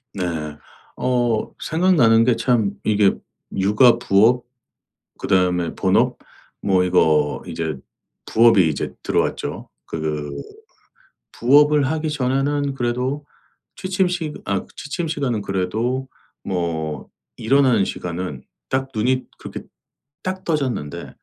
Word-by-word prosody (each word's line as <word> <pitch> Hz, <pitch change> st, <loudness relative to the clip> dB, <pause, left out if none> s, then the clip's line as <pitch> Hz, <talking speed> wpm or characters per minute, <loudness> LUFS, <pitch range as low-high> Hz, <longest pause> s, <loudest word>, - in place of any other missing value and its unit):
네. 80 Hz, -5 st, -3 dB, 0.4 s
어 120 Hz, -3 st, 0 dB
생각나는 155 Hz, -10 st, +4 dB
게 120 Hz, 0 st, +3 dB
참 115 Hz, -3 st, +1 dB
이게 105 Hz, -2 st, +3 dB, 0.4 s
육아, 105 Hz, +5 st, +5 dB
부업 120 Hz, +3 st, +3 dB, 0.7 s
그다음에 90 Hz, -2 st, +1 dB
본업 -, -, +2 dB, 0.4 s
뭐 95 Hz, -2 st, +2 dB
이거 80 Hz, -5 st, +2 dB
이제 80 Hz, -3 st, -3 dB, 0.5 s
부업이 115 Hz, -6 st, +5 dB
이제 75 Hz, -, -3 dB
들어왔죠. -, -, -2 dB, 0.2 s
그 75 Hz, -2 st, -3 dB, 1.0 s
부업을 145 Hz, +3 st, +4 dB
하기 155 Hz, 0 st, -1 dB
전에는 140 Hz, +1 st, 0 dB
그래도 125 Hz, +3 st, -2 dB, 0.5 s
취침 185 Hz, 0 st, 0 dB
시 170 Hz, -4 st, -3 dB
아 100 Hz, -1 st, -1 dB
취침 165 Hz, +3 st, -4 dB
시간은 135 Hz, -9 st, -1 dB
그래도 110 Hz, +8 st, -2 dB, 0.3 s
뭐 80 Hz, -4 st, -3 dB, 0.3 s
일어나는 130 Hz, -3 st, +3 dB
시간은 85 Hz, -7 st, -5 dB, 0.3 s
딱 130 Hz, 0 st, 0 dB
눈이 130 Hz, +4 st, +1 dB
그렇게 -, -, -7 dB, 0.6 s
딱 185 Hz, 0 st, -4 dB
떠졌는데 130 Hz, -, -2 dB
115 Hz, 220 characters per minute, -21 LUFS, 90-135 Hz, 1.0 s, 육아